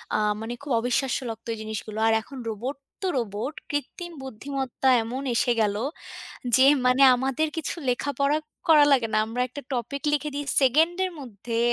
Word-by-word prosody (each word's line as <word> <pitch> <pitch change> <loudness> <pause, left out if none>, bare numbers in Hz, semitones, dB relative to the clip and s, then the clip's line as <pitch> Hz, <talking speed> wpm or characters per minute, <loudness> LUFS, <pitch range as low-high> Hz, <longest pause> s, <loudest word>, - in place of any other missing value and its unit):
আ - - +3 0.2
মানে 230 +2 -4
খুব 280 -1 -7
অবিশ্বাস্য 245 +2 0
লাগত 225 0 -8
জিনিসগুলো। 215 0 -6
আর 225 - +4
এখন 270 +4 -12
রোবট 240 +6 -4 0.3
তো 380 - -1
রোবট; 225 +5 -3 0.2
কৃত্রিম 345 +5 -4
বুদ্ধিমত্তা 265 +1 -2
এমন 250 +4 -4
এসে 245 - +2
গেল 205 -2 +1 0.8
যে 260 0 +6 0.2
মানে, 250 +2 +4
আমাদের 270 +5 0
কিছু 320 - -2
লেখাপড়া 280 +3 +1 0.3
করা 300 -3 +7
লাগে 250 -5 +4
না। - - +3
আমরা 235 +3 -2
একটা 270 +4 -8
টপিক 250 +3 -3
লিখে 295 0 0
দিই, 290 0 -3 0.2
সেকেন্ড 310 +7 +4
এর 370 - -4
মধ্যে 230 -2 -5
260 Hz, 165 wpm, -25 LUFS, 230-285 Hz, 0.8 s, করা